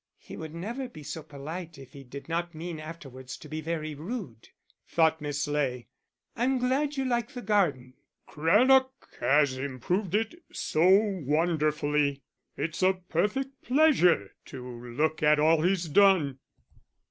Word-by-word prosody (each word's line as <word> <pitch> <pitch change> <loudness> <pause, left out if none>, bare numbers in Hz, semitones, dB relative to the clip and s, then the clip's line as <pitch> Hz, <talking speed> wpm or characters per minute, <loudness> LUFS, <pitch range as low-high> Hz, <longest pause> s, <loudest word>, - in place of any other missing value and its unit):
"He - - -11
would 160 0 -8
never 235 +9 -5
be 155 -10 -11
so 155 +2 -6
polite 155 +3 -8
if 135 -2 -13
he 140 - -10
did 135 +2 -10
not 170 +1 -2
mean 165 0 -6
afterwards 135 -5 -9
to - - -12
be 155 +1 -5
very 155 -1 -3
rude," 155 - -7 0.4
thought 160 -1 +2
Miss 145 0 -2
Ley. 130 -5 -2 0.5
"I'm 255 +3 +1
glad 275 +4 0
you 270 - 0
like 240 +2 -1
the 245 - -5
garden." 155 -12 +1 0.3
"Craddock 255 - +4 0.3
has 140 -2 +3
improved 160 - -2
it 225 +11 -1
so 165 +4 +1
wonderfully. 150 -6 +2 0.3
It's 160 +4 -3
a 185 +1 +5 0.2
perfect 265 +10 -1
pleasure 245 - +3
to 125 -2 -9 0.2
look 155 +5 0
at 150 0 +4
all 160 +1 +4
he's 180 0 +1
done." 160 -6 +4
160 Hz, 145 wpm, -28 LUFS, 145-205 Hz, 0.5 s, a